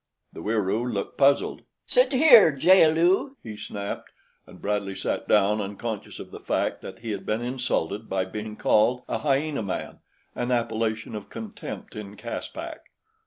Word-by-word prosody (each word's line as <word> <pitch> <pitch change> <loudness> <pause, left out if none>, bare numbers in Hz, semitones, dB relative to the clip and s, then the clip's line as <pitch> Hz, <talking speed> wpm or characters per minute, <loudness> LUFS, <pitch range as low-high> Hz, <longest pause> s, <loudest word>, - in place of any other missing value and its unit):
The - - -8
Wieroo 110 +4 0
looked 100 -3 -4
puzzled. 140 0 +3 0.2
"Sit - - +3
here, 255 - +8
jaal 160 +4 +6
lu," 180 - +2
he 110 -2 -7
snapped, 100 -1 -6 0.4
and - - -14
Bradley 100 -1 -2
sat - - -3
down 105 +2 +3
unconscious 105 +2 -5
of - - -9
the - - -8
fact - - -1
that 95 +2 -9
he 115 -2 -4
had 100 -2 -4
been 110 +4 -1
insulted 115 -5 -2
by 95 -1 0
being 105 +3 -6
called 125 +4 +3
a - - -2
hyena 145 -1 0
man, 100 -3 -4 0.3
an 120 0 -3
appellation 115 -2 -1
of 105 -2 -7
contempt 215 - -8
in 105 -1 -8
Caspak. 115 +2 -6
115 Hz, 160 wpm, -26 LUFS, 105-140 Hz, 0.4 s, here